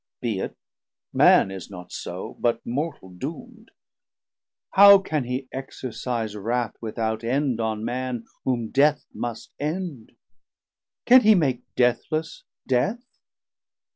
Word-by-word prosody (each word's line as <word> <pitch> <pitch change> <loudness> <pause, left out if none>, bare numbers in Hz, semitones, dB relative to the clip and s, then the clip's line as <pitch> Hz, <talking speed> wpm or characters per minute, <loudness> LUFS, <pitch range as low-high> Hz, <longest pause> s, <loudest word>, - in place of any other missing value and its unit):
be 115 -5 -2
it, - - -4 0.6
man 95 - +5
is 95 -2 -8
not 90 -2 -10
so, - - -6
But 115 -1 0
mortal 140 - -3
doom'd. 220 - -8 1.0
How 200 0 +9
can 155 -8 -2
he 130 +2 -3
exercise 120 -4 -4
Wrath 115 +3 -1
without 110 0 -3
end 130 0 0
on 110 -1 -2
Man 125 -1 -3 0.2
whom 120 -4 -1
Death 145 +2 +3
must 120 -2 -6
end? 155 -5 -4 0.9
Can 255 +1 +8
he 215 -1 +6
make 135 -9 +1
deathless 155 - 0 0.2
Death? 205 - 0
125 Hz, 115 wpm, -24 LUFS, 115-155 Hz, 1.0 s, How